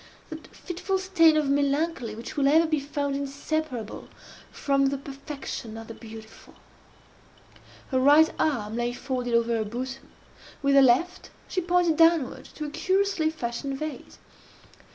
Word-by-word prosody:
that 315 0 -8
fitful 375 +2 -3
stain 355 -4 +4
of 300 -2 +1
melancholy 280 -3 0
which 230 +2 -8
will 280 -2 +2
ever 320 +4 +5
be 310 -2 0
found 285 0 -3
inseparable 280 -3 -4 0.4
from 275 -1 +1
the 275 +1 -1
perfection 275 -4 -7
of 225 - -8
the 225 - -9
beautiful. 220 -1 -13 1.4
Her 260 - +2
right 295 +4 +6
arm 225 -8 0
lay 240 0 -1
folded 250 -2 -2
over 235 0 +2
her 220 - 0
bosom. 255 +5 -6 0.5
With 280 0 +3
her 275 - +7
left 270 +8 +2 0.2
she 370 - -1
pointed 350 -2 +2
downward 330 -5 +3
to 305 - -5
a 295 - -6
curiously 380 -1 +1
fashioned 270 -2 -4
vase. 310 +1 -7
280 Hz, 145 wpm, -26 LUFS, 245-315 Hz, 1.4 s, her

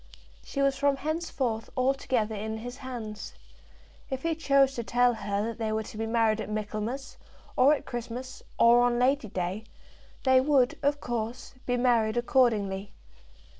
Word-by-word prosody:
She 275 - -2
was 275 -1 +3
from 285 0 +2
henceforth 275 -7 -2
altogether 255 -4 +1
in 220 +1 -4
his 245 +3 -7
hands. 235 -6 -7 0.7
If 265 -1 -4
he 330 0 +1
chose 275 -3 +3
to 235 - -4
tell 245 +1 +3
her 205 -2 -2
that 230 +1 -5
they 220 -1 -1
were 220 0 -1
to 215 - -11
be 225 +1 -3
married 225 -1 +2
at - - -6
Michaelmas, 215 +5 -4 0.4
or 275 +4 +6
at - - -8
Christmas, 245 +2 -6 0.2
or 235 +1 +6
on 245 0 +2
Lady 255 0 +2
Day, 185 +2 -3 0.6
they 260 -1 +5
would, 265 -3 +3
of 285 0 +1
course, 240 +1 -4
be 245 0 +1
married 240 -2 +2
accordingly. 210 -6 +1
240 Hz, 160 wpm, -28 LUFS, 220-265 Hz, 0.7 s, or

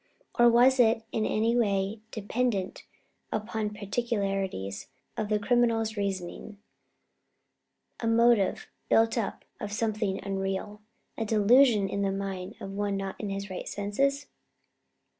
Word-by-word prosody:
Or 240 -1 +6
was 250 +3 +5
it 225 -1 +4
in 215 - 0
any 225 +2 +1
way 200 -2 +1
dependent 220 -3 -2 0.5
upon 215 0 -2
peculiarities 195 - -3 0.3
of 215 -1 -3
the 210 - +2
criminal's 225 0 +1
reasoning 200 +1 -4 1.4
a 230 - -2
motive 230 -3 +3 0.2
built 225 0 +4
up 225 -5 -3
of 210 - -5
something 210 -2 -1
unreal, 195 +1 -3 0.4
a 225 - 0
delusion 220 0 +5
in 200 - -2
the 195 -1 +1
mind 195 -2 -4
of 195 - -7
one 200 0 -1
not 195 -1 -4
in 210 - -4
his 195 0 -4
right 185 - -5
senses?" 275 +8 -1
210 Hz, 125 wpm, -28 LUFS, 195-230 Hz, 1.4 s, Or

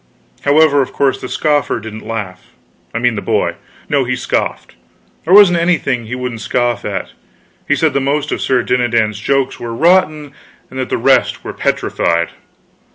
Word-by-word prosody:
However, 145 0 +4
of 130 - -4
course 135 -2 0
the 130 - -6
scoffer 145 -5 0
didn't 110 0 -9
laugh 100 -5 -6 0.4
I - - -4
mean 120 0 +1
the 105 - -4
boy. - - 0 0.3
No, 140 -2 +1
he 130 +1 -1
scoffed; 125 -2 -2 0.5
there 175 - +2
wasn't 185 -4 +7
anything 150 -8 0
he 125 - -4
wouldn't 125 -3 -5
scoff 120 -2 -1
at. - - -4 0.6
He - - +3
said - - +1
the 140 - +1
most 140 +2 -1
of - - -2
Sir 130 -2 +1
Dinadan's 115 -4 0
jokes 135 +3 0
were 115 -1 -5
rotten 155 -2 +2 0.4
and 130 - -6
the - - 0
rest - - +2
were - - -6
petrified. 85 0 0
130 Hz, 165 wpm, -16 LUFS, 115-145 Hz, 0.6 s, wasn't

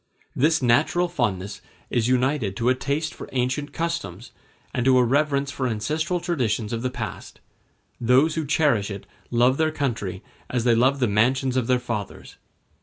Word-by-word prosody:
This 155 +1 +2
natural 150 +9 +3
fondness 100 - -2 0.3
is 120 -2 +1
united 125 -5 +1
to 120 +1 +1
a - - +5
taste 145 +4 -2
for - - -9
ancient 130 +3 -1
customs, 165 - -4 0.4
and 125 - 0
to 130 0 +5
a 125 - +5
reverence 140 +2 +1
for 130 -2 -2
ancestral 155 +10 -1
traditions 125 - -1
of 115 - -2
the 130 - -1
past; - - -7 0.6
those 130 +7 +4
who 160 -2 -3
cherish 135 -10 +2
it 100 -1 -7 0.2
love 125 +2 +3
their 160 0 +2
country 110 -11 -3 0.3
as 125 -2 -1
they 120 -1 +4
love 130 +4 +2
the 125 - +3
mansions 125 +5 +2
of 125 -3 0
their 125 - +3
fathers. 120 -5 -6
130 Hz, 170 wpm, -24 LUFS, 115-145 Hz, 0.6 s, a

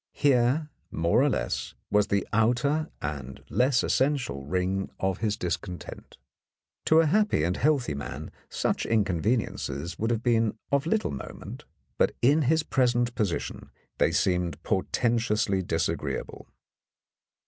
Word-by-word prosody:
Here, 140 +2 +2 0.2
more 85 +9 +2
or 145 - +4
less, - - -2 0.2
was 105 0 +3
the 100 -1 0
outer 125 +8 +2
and 70 -3 -5
less 125 +3 +3
essential 130 - 0
ring 95 +3 -1
of 95 0 -1
his 105 -2 0
discontent; 90 +1 -5 0.7
to 160 +1 +6
a - - +2
happy 205 - +2
and 90 +2 +1
healthy 140 - +1
man 70 0 -6 0.2
such - - -1
inconveniences 95 - -1
would 115 - 0
have 115 -1 -1
been 115 -2 +2
of 140 +2 +1
little 215 +4 +1
moment, 70 - -8 0.3
but - - +3
in 145 +6 +4
his 160 0 +3
present 120 -3 +1
position 100 -7 -3 0.3
they - - +3
seemed 90 -2 0
portentously 105 -1 +1
disagreeable. 90 - -3
115 Hz, 125 wpm, -27 LUFS, 90-135 Hz, 0.7 s, to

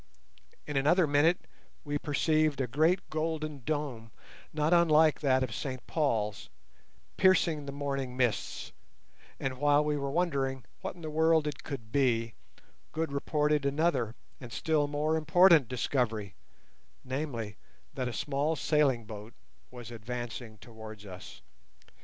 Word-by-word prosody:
In 150 -2 -3
another 160 +6 +4
minute 150 +4 +3 0.4
we 145 -1 -2
perceived 155 0 +1
a 135 - +1
great 155 +9 +2
golden 155 -2 -2
dome, 140 -6 -3 0.4
not 155 +2 +1
unlike 160 -2 +5
that 130 -3 +2
of 120 -4 -3
St 130 +2 -5
Paul's, 110 -10 -1 0.7
piercing 165 -6 +3
the - - -3
morning 140 -3 -3
mists, 125 -5 -1 0.7
and 130 -1 -3
while 145 +1 +4
we 150 -1 0
were 140 -1 -2
wondering 135 -5 0 0.2
what - - -5
in 175 - -13
the 155 -1 -5
world 160 0 +3
it 150 -3 -4
could 115 -7 -7
be, 115 -5 +1 0.6
Good 160 -1 -2
reported 150 +1 +1
another 140 -5 +1 0.2
and 120 -2 -10
still 155 +1 +1
more 150 +2 0
important 160 -2 +5
discovery, 115 -5 -1 0.7
namely, 130 -6 -4 0.4
that 130 -3 -2
a - - -6
small 145 +6 0
sailing 140 -8 +2
boat 105 +1 -9 0.3
was 120 -2 -10
advancing 120 0 -6
towards 110 -1 -11
us. 95 -1 -10
140 Hz, 135 wpm, -30 LUFS, 120-155 Hz, 0.7 s, unlike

